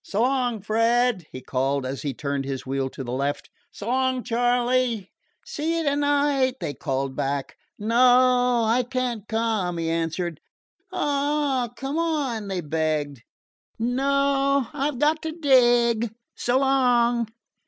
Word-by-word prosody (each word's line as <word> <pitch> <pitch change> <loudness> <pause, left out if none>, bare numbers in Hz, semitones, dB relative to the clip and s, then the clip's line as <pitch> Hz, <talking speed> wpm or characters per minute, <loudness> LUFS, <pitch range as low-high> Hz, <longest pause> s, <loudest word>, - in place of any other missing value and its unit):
"So 210 +3 -1
long, 250 -4 0
Fred," 230 -2 +1
he 130 - -8
called 135 +1 -1
as 130 +1 -4
he 145 - -2
turned 140 -1 -2
his 135 -1 -5
wheel 135 0 -2
to 135 - -7
the 120 - -6
left. 140 +3 -2 0.2
"So 205 - -9
long, 260 0 +1
Charley." 245 -2 +1 0.3
"See 325 +3 -2
you 330 - -1
to 285 -2 +1
night!" 285 -2 +2
they 165 -6 -3
called 135 -1 -3
back. 140 -1 -2 0.2
"No 245 +2 +4
I 230 +3 +3
can't 245 -4 -3
come," 220 -6 -1
he 165 0 -1
answered. 165 0 -2 0.5
"Aw, 285 -3 0
come 275 +4 -3
on," 285 -10 -1
they 190 -2 -2
begged. 155 -4 -2 0.6
"No, 275 +2 +1
I've 290 -1 -2
got 305 +4 +2
to 320 0 -4
dig. 240 -6 +3 0.2
So 245 +1 0
long!" 245 -3 +2
240 Hz, 140 wpm, -24 LUFS, 165-265 Hz, 0.6 s, No